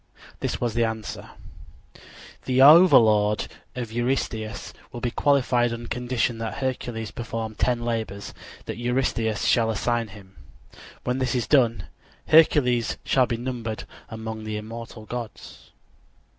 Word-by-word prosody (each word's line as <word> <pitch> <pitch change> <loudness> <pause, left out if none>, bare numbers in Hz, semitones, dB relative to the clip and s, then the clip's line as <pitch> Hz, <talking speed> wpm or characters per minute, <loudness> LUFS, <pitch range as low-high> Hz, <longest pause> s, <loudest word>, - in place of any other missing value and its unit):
This - - -2
was 120 -3 -1
the 120 +1 +2
answer: 110 -1 -4 1.2
_The 130 0 +1
overlordship 115 - +6 0.2
of 120 -3 -5
Eurystheus 120 -2 -2 0.2
will 120 - -7
be 120 0 -2
qualified 125 -4 +2
on 115 0 -5
condition 120 -1 -1
that 115 -1 -4
Hercules 120 -4 -3
perform 115 -2 -5
ten 120 +1 0
labors 110 -4 -3 0.3
that - - -5
Eurystheus 120 -3 0
shall 115 -2 +3
assign 115 +1 0
him. 100 -4 -15 0.7
When 125 +1 -1
this 130 -1 0
is 120 -3 0
done, 115 -5 +2 0.4
Hercules 130 -7 +4
shall 130 -2 +3
be 115 - -2
numbered 120 -3 -4 0.3
among 110 -1 -6
the 110 0 -4
immortal 110 +1 -8
gods. 120 -1 -8
115 Hz, 130 wpm, -24 LUFS, 110-125 Hz, 1.2 s, overlordship